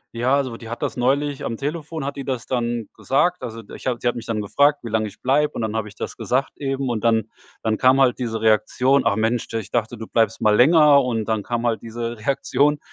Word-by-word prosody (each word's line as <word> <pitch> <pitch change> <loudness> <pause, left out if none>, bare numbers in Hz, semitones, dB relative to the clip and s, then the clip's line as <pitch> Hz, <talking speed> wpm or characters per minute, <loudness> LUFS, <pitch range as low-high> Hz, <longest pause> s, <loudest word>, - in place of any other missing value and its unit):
Ja, 125 +4 +2
also 130 -5 -1
die 115 - -11
hat 120 - -6
das - - -2
neulich 140 +3 0
am 115 - -2
Telefon 155 +3 -4
hat 140 +1 -4
die 135 - -5
das 130 -3 -3
dann 120 -3 -2
gesagt. 175 +7 +1
Also 115 -1 -6
d 105 - -15
ich - - -8
habe 125 -2 0
sie 120 - +2
hat - - -3
mich 115 - -6
dann 110 -2 -2
gefragt, 145 +8 +2
wie 115 - -5
lang 110 0 0
ich 105 -1 -10
bleibe, 145 +3 +2
und - - -4
dann 110 -1 -2
habe 110 -1 -2
ich 105 - -13
das - - -6
gesagt 130 +2 0
eben. 135 -1 -2
Und 115 -2 -2
dann 110 -2 +2 0.3
dann 110 -1 0
kam 130 +1 +4
halt 130 -2 +3
diese 115 -3 -3
Reaktion: 125 +5 +3
„Ach - - +3
Mensch, 110 +2 0
de 115 0 -3
ich 100 - -13
dachte, 120 0 -1
du 110 0 -8
bleibst 115 -1 +1
mal 105 -2 +4
länger“ 145 +4 +6
und 115 -4 -2
dann 110 -2 0
kam 120 +1 -2
halt 115 -2 0
diese 115 +1 -5
Reaktion. 140 +4 +1
120 Hz, 255 wpm, -22 LUFS, 110-135 Hz, 0.3 s, länger